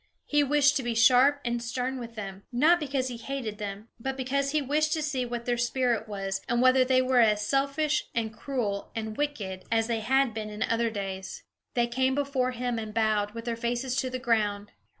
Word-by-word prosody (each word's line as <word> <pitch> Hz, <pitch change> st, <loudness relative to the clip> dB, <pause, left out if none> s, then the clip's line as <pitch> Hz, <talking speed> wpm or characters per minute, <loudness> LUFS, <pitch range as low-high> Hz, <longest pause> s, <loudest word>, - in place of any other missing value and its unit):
He 295 Hz, 0 st, +3 dB
wished 285 Hz, 0 st, +4 dB
to -, -, -1 dB
be 240 Hz, -2 st, -2 dB
sharp 255 Hz, +5 st, +5 dB
and 235 Hz, 0 st, -1 dB
stern 250 Hz, +2 st, -3 dB
with 230 Hz, -1 st, -8 dB
them, 195 Hz, -3 st, -6 dB
not 310 Hz, +8 st, +4 dB
because 270 Hz, -4 st, -1 dB
he 240 Hz, -, -6 dB
hated 230 Hz, -3 st, -5 dB
them; 205 Hz, +1 st, -6 dB
but 265 Hz, +3 st, -3 dB
because 275 Hz, +2 st, 0 dB
he 305 Hz, +2 st, +1 dB
wished 300 Hz, +2 st, +1 dB
to 315 Hz, -, -1 dB
see 265 Hz, -4 st, -1 dB
what 240 Hz, 0 st, -5 dB
their 240 Hz, -1 st, 0 dB
spirit 240 Hz, -2 st, 0 dB
was, 195 Hz, -2 st, -3 dB
and 240 Hz, 0 st, +2 dB
whether 255 Hz, +1 st, +5 dB
they 255 Hz, 0 st, +3 dB
were 255 Hz, -1 st, +3 dB
as 210 Hz, -2 st, +4 dB
selfish, 280 Hz, +2 st, +1 dB
and 225 Hz, -2 st, -1 dB
cruel, 215 Hz, -7 st, -3 dB
and 220 Hz, -1 st, -4 dB
wicked 210 Hz, -11 st, -3 dB
as 225 Hz, -1 st, +3 dB
they 230 Hz, -1 st, -1 dB
had 265 Hz, +2 st, +2 dB
been 215 Hz, -1 st, -4 dB
in 210 Hz, +1 st, -3 dB
other 230 Hz, 0 st, +1 dB
days. 195 Hz, -3 st, -5 dB, 0.3 s
They 240 Hz, -1 st, +3 dB
came 260 Hz, +2 st, 0 dB
before 275 Hz, -3 st, 0 dB
him, 245 Hz, -1 st, -2 dB
and 215 Hz, -1 st, -7 dB
bowed, 215 Hz, -1 st, +1 dB
with 230 Hz, 0 st, -6 dB
their 235 Hz, -1 st, -1 dB
faces 240 Hz, +2 st, -2 dB
to 265 Hz, -2 st, 0 dB
the 255 Hz, -, -3 dB
ground. 210 Hz, -5 st, 0 dB
240 Hz, 210 wpm, -28 LUFS, 220-265 Hz, 0.3 s, sharp